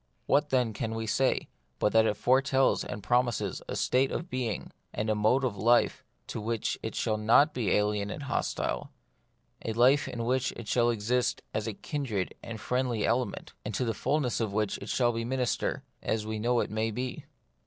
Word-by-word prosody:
What, 145 +1 +3
then, 125 -5 +2
can 115 +1 -3
we 115 0 -3
say 130 +4 +3
of - - -5
it, - - -19 0.3
but 105 - +1
that 110 0 +5
it 105 - 0
fore 130 +5 +4
tells 135 -1 +2
and 105 - -6
promises 120 0 +1
a - - -4
state 130 +1 +2
of 170 +1 -4
being 125 -4 -2 0.2
and 110 +1 -1
a - - +4
mode 110 +6 +2
of 125 -5 0
life 120 +5 +3 0.2
to 110 - -5
which 115 0 -1
it - - -5
shall 110 - 0
not 120 +8 +5
be 115 -6 -1
alien 105 0 +1
and 145 - -5
hostile; 140 - -2 0.7
a 110 - -2
life 130 +5 +4
in 115 -1 -4
which 130 +1 +1
it 120 - -9
shall 120 +1 +3
exist 120 +2 0
as 110 +1 -2
a 110 - -2
kindred 120 -11 -3
and 115 -1 -7
friendly 125 -1 0
element, 120 +2 -1
and 105 -1 -4
to 130 - 0
the 115 - 0
fulness 130 +3 0
of 110 -3 -1
which 105 -1 0
it 100 - -8
shall 120 -2 +2
be 115 0 -3
minister, 125 0 -1 0.2
as 110 -1 -1
we 110 0 -3
know 120 +2 +2
it - - -3
may 110 +1 0
be. 125 +3 -4
115 Hz, 205 wpm, -29 LUFS, 110-130 Hz, 0.7 s, that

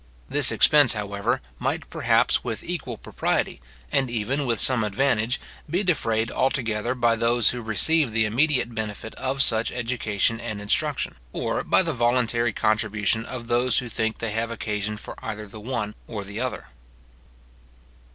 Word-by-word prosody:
This - - +4
expense, 145 -5 +5
however, 100 -2 -1 0.2
might, - - -2
perhaps, - - +2
with - - -4
equal - - -4
propriety, - - -1 0.3
and 135 -2 +1
even 125 +5 -1
with 115 -3 +1
some 125 -4 +6
advantage, 115 +2 +1 0.3
be 180 +6 0
defrayed 115 - +1
altogether 120 -3 0
by 120 -2 +3
those 115 0 +3
who 125 - -5
receive 125 +6 +2
the 110 0 +2
immediate 125 +2 +1
benefit 110 0 -5
of 135 +1 0
such 110 0 +1
education 115 -3 -1
and 110 -3 -5
instruction, 105 -10 -1 0.2
or - - -1
by - - +3
the - - -2
voluntary 120 -1 +2
contribution 110 0 0
of 125 -2 -6
those 120 +1 +1
who 125 -2 -1
think 110 0 -1
they 115 -2 -3
have 115 +2 -1
occasion 105 -2 -3
for - - -8
either 105 0 -5
the 105 +1 -10
one 110 -3 -3
or 105 -3 -5
the 100 +2 -7
other. 130 0 -4
115 Hz, 155 wpm, -25 LUFS, 110-125 Hz, 0.3 s, some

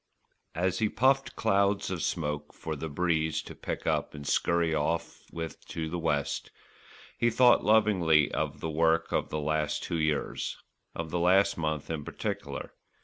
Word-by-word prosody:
As 90 +5 0
he 110 -2 +2
puffed 135 +4 +2
clouds 100 -2 +1
of 90 -3 -3
smoke 75 -3 -2
for 80 - -4
the 80 +2 -5
breeze 80 0 0
to - - -9
pick - - -5
up - - 0
and 75 -1 -8
scurry 85 +2 +2
off 80 +2 -1
with 80 -1 -6
to 80 -1 -4
the 85 +2 -3
west, 75 -4 -1 0.7
he 120 - +4
thought 120 +1 +5
lovingly 95 -9 +4
of - - -2
the 80 - -2
work 80 +1 +2
of - - 0
the 75 - -2
last 75 0 -1
two 85 - -2
years, 75 -1 -1 0.4
of 80 -1 -4
the 85 - 0
last 95 +3 +4
month 80 -2 -2
in 80 -3 -3
particular. - - -5
80 Hz, 165 wpm, -29 LUFS, 75-95 Hz, 0.7 s, thought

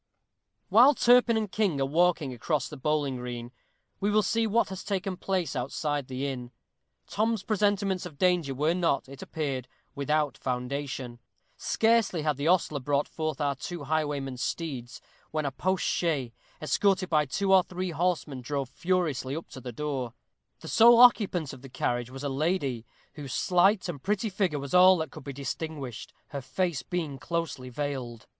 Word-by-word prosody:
_ - - -55 0.7
While 245 +8 +7
Turpin 240 -2 +5
and 215 -3 -2
King 195 -10 +1
are 135 - +2
walking 160 -2 +2
across 135 +3 -1
the 150 - -9
bowling 145 -1 0
green, 120 -1 -6 0.5
we 200 - +1
will 210 0 +3
see 225 +4 +1
what 230 +2 +2
has 190 -1 -6
taken 195 -2 -2
place 185 -4 -2
outside 140 +2 -2
the 130 +1 -3
inn. 125 -3 -4 0.6
Tom's 220 0 0
presentiments 200 -3 0
of 155 -5 -14
danger 175 -6 +2
were 150 +5 +2
not, 170 -7 0
it 135 0 -11
appeared, 135 -5 -3 0.3
without 150 +1 0
foundation. 125 -1 -4 0.4
Scarcely 220 -7 +2
had 150 -3 0
the 140 +2 -1
ostler 165 -4 +2
brought 140 +2 0
forth 155 -3 -3
our 145 -2 +1
two 145 +5 -6
highwaymen's 145 -4 -2
steeds, 130 -9 -4 0.3
when 155 -1 -2
a 140 - -1
post 185 +6 -1
chaise, 145 -8 0 0.3
escorted 185 +6 +1
by 150 -2 +2
two 195 +8 +1
or 190 - +8
three 180 0 -4
horsemen, 160 -5 -1
drove 135 0 -3
furiously 165 -7 -1
up 165 - -7
to 130 - -10
the 125 - -6
door. 130 -2 -3 0.5
The - - -9
sole 235 +1 +7
occupant 200 - +5
of 125 - -11
the 135 - -11
carriage 120 -1 -2
was 135 +2 -8
a - - -1
lady, 140 -5 -1 0.3
whose 140 -4 -7
slight 185 +3 +3
and 155 -6 -5
pretty 210 +4 -1
figure 185 -6 0
was 140 -1 -6
all 185 +1 +7
that 160 -4 -3
could - - -10
be 140 - -4
distinguished, 140 -2 -5 0.2
her 140 -2 -5
face 145 +4 -1
being 160 -7 -4
closely 155 -5 -3
veiled. 125 -4 -4
150 Hz, 175 wpm, -28 LUFS, 135-185 Hz, 0.7 s, or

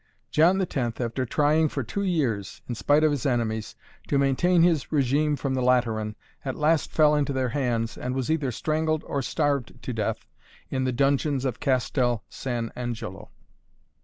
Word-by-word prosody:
John 175 +5 +4
X., 190 - -2
after 120 0 -1
trying 150 +4 +3
for 135 - -3
two 200 - -4
years, 125 - -1
in 125 - -3
spite 145 +6 +2
of 155 - +4
his 145 -4 -2
enemies, 115 -4 -1 0.3
to 140 - +1
maintain 165 +6 +3
his 165 -7 +2
regime 145 +1 +2
from 135 -1 -2
the 130 - 0
Lateran, 115 -4 +1 0.3
at 130 -2 -3
last 155 +1 +1
fell 150 -1 +4
into 145 -1 +1
their 130 -1 0
hands 120 -4 -1
and 125 +1 -3
was 135 +2 -1
either 150 -5 0
strangled 155 +3 -1
or 140 - -2
starved 140 -2 -1
to - - -5
death - - -2 0.5
in 130 -1 0
the 130 - +1
dungeons 140 +1 +1
of 130 -4 -2
Castel 125 -3 +1
San 120 -3 -3
Angelo. 120 -2 -5
135 Hz, 170 wpm, -26 LUFS, 120-150 Hz, 0.5 s, John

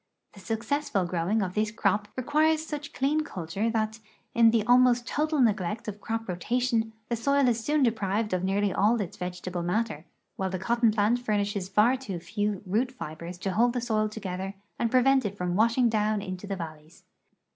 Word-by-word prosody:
The 200 - -13
successful 225 0 -1
fjrowing 180 +5 0
of 180 - -6
this 215 +1 +1
crop 210 -1 0
requires 305 +4 +2
such 295 -2 -6
clean 290 +4 +1
culture 195 - -3
that, 220 0 -1 0.3
in 230 -1 +6
the 225 -2 +2
almost 245 0 +5
total 305 0 0
neglect 210 -4 +1
of 210 -1 -5
croj) 225 0 -3
rotation, 225 +5 0 0.2
the 235 - +1
soil 280 +3 +2
is 230 -2 +1
soon 295 +1 +2
deprive<l 215 -3 0
of 180 - -2
nearly 195 0 +1
all 220 +4 +3
its 195 -5 -4
vegetable 180 0 -4
matter, 180 -2 -1 0.3
while 190 0 -1
the 185 - -3
cotton 235 +5 +2
plant 215 +3 +2
furnishes 205 -4 -1
far 215 +6 +4
too 210 -9 -5
few 205 +3 -2
root 225 +7 0
fibers 170 -6 -7
to 190 +1 -3
hold 235 +5 +3
the 250 - -1
Soil 215 -3 0
together 195 -2 -5 0.2
and 235 - +1
prevent 260 +2 +4
it 205 -1 -4
from 180 -1 -1
washing 230 +4 +3
down 215 -1 +1
into 185 0 -6
the 195 - -2
valleys. 155 -2 -9
215 Hz, 185 wpm, -27 LUFS, 190-240 Hz, 0.3 s, in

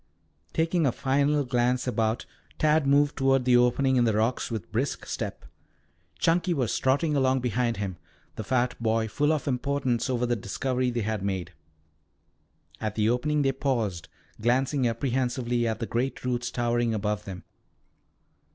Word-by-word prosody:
Taking 165 -1 +1
a - - +2
final 140 +3 +1
glance 125 0 +1
about, 115 -2 0 0.3
Tad 155 -1 +3
moved 145 +1 +3
toward 135 -1 +2
the 125 -1 +5
opening 125 +2 +3
in 120 - +4
the 110 -3 +2
rocks 115 +4 0
with 100 -7 -5
brisk 125 +7 -2
step. - - -5 0.7
Chunky 175 +1 +2
was 125 -6 0
trotting 145 +4 +1
along 130 -1 +2
behind 120 -1 0
him, 95 -3 -4 0.4
the 110 - -5
fat 125 +3 +1
boy 110 0 +1
full 145 +7 +1
of 155 -1 -1
importance 130 -1 0
over 125 -1 0
the 120 0 +1
discovery 125 +5 -1
they 120 -1 -2
had 110 -1 -2
made. 95 -3 -3 1.3
At 110 -1 -3
the 110 +1 +2
opening 150 +4 +1
they 135 - +3
paused, 115 - -2 0.3
glancing 130 +3 +2
apprehensively 120 0 0
at 110 -1 -2
the 115 - -2
great 125 +3 -2
roots 120 -1 -1
towering 120 -1 0
above 105 0 -2
them. 95 -2 -7
125 Hz, 155 wpm, -27 LUFS, 115-135 Hz, 1.3 s, the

